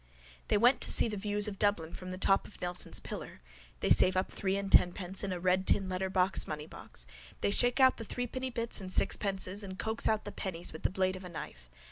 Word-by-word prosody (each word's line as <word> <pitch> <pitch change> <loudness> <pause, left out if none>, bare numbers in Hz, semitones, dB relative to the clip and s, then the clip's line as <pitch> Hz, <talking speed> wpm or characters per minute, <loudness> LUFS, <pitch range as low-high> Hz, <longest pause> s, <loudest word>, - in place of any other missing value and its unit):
—They - - +2
want 245 +4 +4
to - - +3
see - - +5
the 215 - -4
views 205 +1 +1
of 200 -2 -6
Dublin 175 -5 0
from 185 - -8
the 185 - -5
top 195 +1 +2
of - - -15
Nelson's 180 0 +1
pillar. - - -8 0.4
They - - 0
save 185 0 +5
up 185 - -1
three 195 -1 -1
and 200 -1 -4
tenpence 180 +2 +3
in 195 - -2
a 180 - -3
red 185 +1 +1
tin 195 -2 +2
letterbox 185 0 +1
moneybox. 150 - -6 0.4
They - - +1
shake 245 +5 +2
out 260 -1 +5
the 230 - -6
threepenny 250 +3 -4
bits 235 -3 -1
and 185 -1 -7
sixpences 195 0 0
and 190 -2 -7
coax 220 +2 0
out 220 -1 0
the 205 - -5
pennies 175 -4 -4
with 160 - -9
the - - +1
blade 185 0 0
of 185 - -9
a 180 - -8
knife. 60 - -8
190 Hz, 225 wpm, -31 LUFS, 185-210 Hz, 0.4 s, see